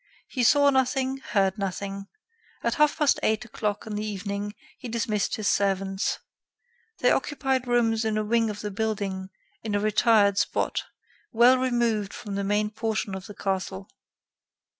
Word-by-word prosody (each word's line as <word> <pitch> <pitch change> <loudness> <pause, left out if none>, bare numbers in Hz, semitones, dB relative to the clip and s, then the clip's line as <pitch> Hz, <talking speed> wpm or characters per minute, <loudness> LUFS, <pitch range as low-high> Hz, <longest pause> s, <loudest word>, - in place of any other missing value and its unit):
He 255 - -3
saw 285 +4 +5
nothing, 265 0 +1
heard 195 -7 0
nothing. 195 +1 -4 0.6
At - - +1
half 300 -3 +3
past 295 -3 +3
eight 220 +2 +1
o'clock 210 -3 -3
in 220 - -6
the 210 0 -2
evening, 205 0 -4 0.2
he 250 - -7
dismissed 215 -3 -1
his 215 -2 -3
servants. 195 -1 0 0.8
They 250 - +5
occupied 265 -3 0
rooms 230 -2 +2
in 220 -1 0
a 215 - +1
wing 225 +1 +2
of 210 -1 -5
the 210 - -4
building, 200 -3 -2 0.3
in 215 -2 -2
a - - +2
retired 210 -1 +4
spot, - - -1 0.5
well 240 +3 +6
removed 235 -5 0
from 205 - -7
the 200 0 -1
main 210 +1 0
portion 220 -2 -2
of 190 +1 -6
the 205 - -10
castle. 190 0 -3
215 Hz, 160 wpm, -26 LUFS, 200-240 Hz, 0.8 s, well